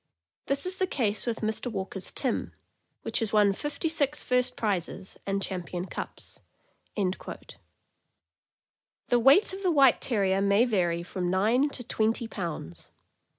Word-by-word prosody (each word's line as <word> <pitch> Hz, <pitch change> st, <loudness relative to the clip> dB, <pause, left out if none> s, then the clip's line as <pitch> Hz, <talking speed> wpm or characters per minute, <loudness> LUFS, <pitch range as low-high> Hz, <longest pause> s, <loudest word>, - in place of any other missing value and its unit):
This 275 Hz, +3 st, +1 dB
is 370 Hz, +1 st, -2 dB
the 375 Hz, -, +1 dB
case 220 Hz, -, -1 dB
with 230 Hz, -1 st, -2 dB
Mr. 220 Hz, +3 st, -1 dB
Walker's 190 Hz, -2 st, -4 dB
Tim, -, -, -2 dB, 0.5 s
which -, -, 0 dB
has 225 Hz, -3 st, -1 dB
won 205 Hz, -2 st, +4 dB
fifty 295 Hz, -, -3 dB
six 295 Hz, -2 st, 0 dB
first 250 Hz, 0 st, +1 dB
prizes 195 Hz, -2 st, -2 dB
and 195 Hz, 0 st, 0 dB
champion 180 Hz, -1 st, -4 dB
cups. -, -, -7 dB, 0.5 s
The 200 Hz, +4 st, -6 dB
weight 280 Hz, -, +5 dB
of 385 Hz, -, -6 dB
the 375 Hz, -, +2 dB
White 275 Hz, -6 st, +5 dB
Terrier 195 Hz, -5 st, +1 dB
may 200 Hz, +4 st, +4 dB
vary 175 Hz, -7 st, 0 dB
from 180 Hz, 0 st, -3 dB
nine 225 Hz, +10 st, +3 dB
to 255 Hz, -, -6 dB
twenty 225 Hz, 0 st, 0 dB
pounds. 165 Hz, -, -6 dB
220 Hz, 140 wpm, -28 LUFS, 190-260 Hz, 0.5 s, weight